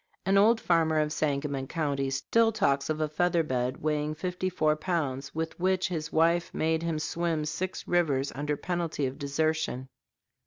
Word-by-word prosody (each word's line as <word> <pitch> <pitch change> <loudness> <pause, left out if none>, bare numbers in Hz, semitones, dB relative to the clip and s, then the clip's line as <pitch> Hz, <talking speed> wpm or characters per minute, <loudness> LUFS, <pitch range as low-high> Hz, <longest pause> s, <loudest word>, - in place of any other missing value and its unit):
An 195 +1 +3
old 220 +4 +5
farmer 165 -4 +2
of 150 0 +1
Sangamon 140 -2 -1
County 140 -4 -1
still 225 +12 +2
talks 140 -11 +1
of 155 0 -1
a 155 - +1
featherbed 150 -6 0
weighing 150 0 -1
fifty 180 +3 -2
four 155 -4 +2
pounds 155 -6 -2
with 160 +1 -3
which 185 +1 +1
his 160 -2 -3
wife 170 +2 +2
made 160 0 +1
him 165 -2 -1
swim 160 0 -1
six 170 +5 -4
rivers 145 -6 +1
under 145 +1 -2
penalty 170 -4 -2
of 130 0 -4
desertion. 145 -2 -1
155 Hz, 160 wpm, -28 LUFS, 145-175 Hz, -, old